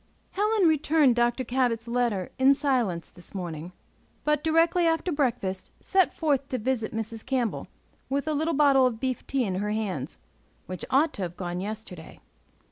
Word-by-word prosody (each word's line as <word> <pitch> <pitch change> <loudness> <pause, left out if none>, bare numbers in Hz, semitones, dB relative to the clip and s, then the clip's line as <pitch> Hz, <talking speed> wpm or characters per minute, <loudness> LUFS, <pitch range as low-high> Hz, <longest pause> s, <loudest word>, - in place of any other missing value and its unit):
HELEN 415 -1 +2
returned 305 -4 +3
Dr. 240 +2 +1
Cabot's 240 -2 0
letter 235 -6 -1
in 270 +1 +6
silence 245 - 0
this 175 +2 -9
morning, 170 -2 -5 0.5
but, 300 -1 +1
directly 330 +2 +3
after 325 +2 0
breakfast, 240 - -1
set 380 -2 +2
forth 285 -4 0
to 255 - -1
visit 240 -1 -1
Mrs. 225 0 -5
Campbell, 255 -5 -1 0.4
with 280 +1 -1
the 310 - -1
little 315 +2 0
bottle 275 -3 +5
of 230 -3 -4
beef 260 -1 -3
tea 270 -2 0
in 190 -4 -2
her 210 - -2
hands, 195 -10 -3 0.5
which 185 0 -6
ought 290 +4 +3
to - - -7
have 175 -1 -4
gone 175 -1 -4
yesterday. 205 -5 -7
250 Hz, 165 wpm, -27 LUFS, 210-290 Hz, 0.5 s, in